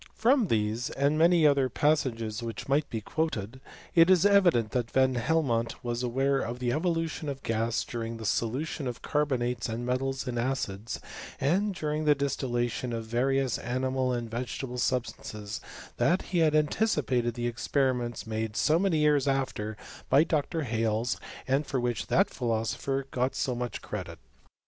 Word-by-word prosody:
From 240 0 +3
these, 110 0 0
and 140 +2 +1
many 165 0 +5
other 140 -3 +4
passages 120 -8 0
which 115 -2 -5
might 145 +2 +1
be 110 - -3
quoted, 130 -3 -3 0.3
it 165 +1 +6
is 185 -1 +5
evident 175 - +4
that 120 -2 -1
Van 130 +1 +3
Hel 155 +7 +1
mont 115 -3 0
was 120 0 -2
aware 135 +3 +1
of 120 0 -3
the 125 -1 -1
evolution 165 0 -1
of 135 -1 -6
gas 115 0 0
during 115 -1 -5
the 110 - -7
solution 130 +7 -1
of 120 - -6
carbonates 125 -5 0
and 115 +2 -3
metals 135 +1 -1
in 120 -1 -2
acids, 115 -4 -2 0.4
and 190 +8 +1
during 155 -1 -2
the 150 -1 +5
distillation 125 -3 -1
of 115 -1 -3
various 130 +2 +1
animal 130 +1 -1
and 120 -2 -3
vegetable 125 +1 -4
sub 125 0 +1
stances, 105 -2 -7 0.4
that 180 +2 +2
he 175 - +3
had 155 -2 +4
anticipated 145 - +1
the 120 -1 -3
experiments 120 0 -1
made 110 0 -3
so 155 +2 +3
many 190 -4 +2
years 150 -2 +3
after 130 -6 -1 0.3
by 145 - +6
Dr. 160 0 -1
Hales, 115 -1 0 0.3
and 135 +3 +1
for 135 - -1
which 120 -1 -2
that 195 +4 +3
philosopher 120 +3 -1
got 125 +1 0
so 130 - 0
much 120 0 -4
credit. - - -6
130 Hz, 165 wpm, -29 LUFS, 115-150 Hz, 0.4 s, it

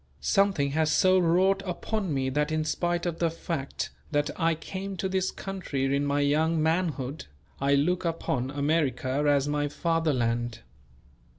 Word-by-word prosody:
Something 145 - +2
has 155 +1 +1
so 185 +2 +4
wrought 185 +3 +3
upon 195 +1 -3
me 135 -2 0
that 150 +3 0
in 155 0 0
spite 175 +2 -1
of 170 -2 -2
the 170 - +2
fact 160 -3 -4 0.2
that 145 -1 0
I 165 -2 +1
came 190 +4 -6
to 190 - -1
this 190 0 0
country 140 -9 -2
in 140 +1 0
my 145 0 +1
young 155 +3 +2
manhood, 155 -4 -1 0.3
I 140 +1 +3
look 175 +6 +1
upon 150 -6 -1
America 145 -1 0
as 140 -1 +3
my 145 0 0
Fatherland. 125 -8 0
155 Hz, 155 wpm, -27 LUFS, 140-175 Hz, 0.3 s, so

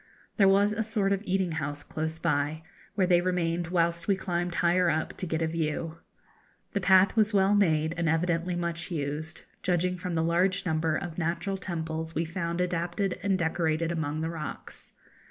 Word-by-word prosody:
There 200 -3 +6
was 200 +2 +4
a 220 - -1
sort 210 -3 0
of 195 - -1
eating 190 -2 0
house 145 -2 -3
close 160 +1 -3
by, 155 -1 0 0.3
where 190 - +3
they 175 -1 +4
remained 175 -2 0
whilst 170 -1 0
we 200 - +4
climbed 175 -2 -2
higher 175 +1 +3
up 160 -1 -1
to 185 - -3
get 160 0 -1
a - - +1
view. 160 0 -2 0.7
The 200 - -1
path 190 +1 +5
was 215 -1 +3
well 195 +1 +4
made, 160 -6 +2
and 170 -2 +1
evidently 170 +2 0
much 170 -1 -3
used, 155 0 -3 0.2
judging 180 0 +1
from 180 -1 -4
the 160 - +1
large 185 +4 +1
number 160 -2 +1
of 175 -1 -4
natural 175 +4 -1
temples 160 -3 -4
we 165 +2 0
found 170 +1 -2
adapted 180 +2 -1
and 195 -2 +1
decorated 165 -1 0
among 155 -2 -2
the 160 +1 -2
rocks. 155 -3 -7
170 Hz, 180 wpm, -28 LUFS, 160-185 Hz, 0.7 s, There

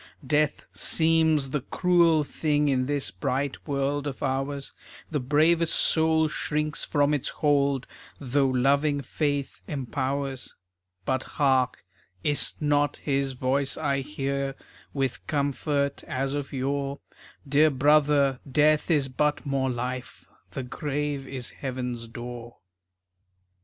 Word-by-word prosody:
Death 150 +2 +1
seems 160 -4 +2
the 150 - -1
cruel 170 +1 +3
thing 150 0 0
In 130 -2 +1
this 140 -8 -1
bright 130 - -3
world 140 0 -1
of 135 - -5
ours. 135 +1 -2 0.4
The 150 - 0
bravest 155 +5 +3
soul 160 0 +4
shrinks 150 0 -2
from 145 -1 +2
its 145 - -1
hold 140 -3 +1 0.3
Though 135 0 +1
loving 140 +3 +2
faith 145 +1 -2
empowers. 135 -1 -3 0.5
But, 130 0 0
hark! 130 -7 +2 0.4
Is 145 -1 +2
't 150 - -6
not 145 0 +2
his 140 -2 -1
voice 135 +2 0
I 140 -3 0
hear, 140 -1 -3 0.4
With 135 -3 -3
comfort 140 0 -1
as 135 +1 -2
of 145 -1 -4
yore? 140 +1 -2 0.5
"Dear 145 +3 +5
brother, 140 -1 +3
Death 155 +3 +3
is 145 -5 +2
but 150 +4 0
more 135 -1 0
Life, 125 +1 -5 0.2
The 135 - -5
grave 145 +1 -3
is 130 -3 -3
heaven's 125 -3 -4
door." 120 0 -8
140 Hz, 120 wpm, -26 LUFS, 135-150 Hz, 0.5 s, Dear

